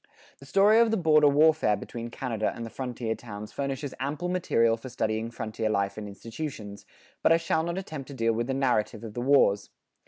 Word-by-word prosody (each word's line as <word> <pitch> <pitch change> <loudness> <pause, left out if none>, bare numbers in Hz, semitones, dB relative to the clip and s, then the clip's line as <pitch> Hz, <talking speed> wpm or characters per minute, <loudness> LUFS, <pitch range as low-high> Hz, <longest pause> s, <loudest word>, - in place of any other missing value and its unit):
The 140 - -14
story 200 +8 +5
of 230 -1 +5
the 225 - +1
border 155 -4 +5
warfare 150 -5 +4
between 115 +3 -7
Canada 115 -3 -2
and 115 - -6
the 115 - -8
frontier 120 -3 -3
towns 105 -2 -9
furnishes 140 0 -4
ample 150 +6 -2
material 115 -11 +2
for 115 +3 -9
studying 110 -1 -2
frontier 110 -2 -3
life 100 -1 0
and 110 -1 -6
institutions; 110 -1 -7 0.3
but - - +4
I 165 - +7
shall 165 -1 0
not 170 +2 -3
attempt 155 -8 -6
to 140 - -9
deal 115 -2 +1
with 115 +1 -2
the 135 - -1
narrative 125 -5 0
of 110 -2 -7
the 120 - -4
wars. 125 -7 +3
125 Hz, 200 wpm, -27 LUFS, 110-150 Hz, 0.3 s, I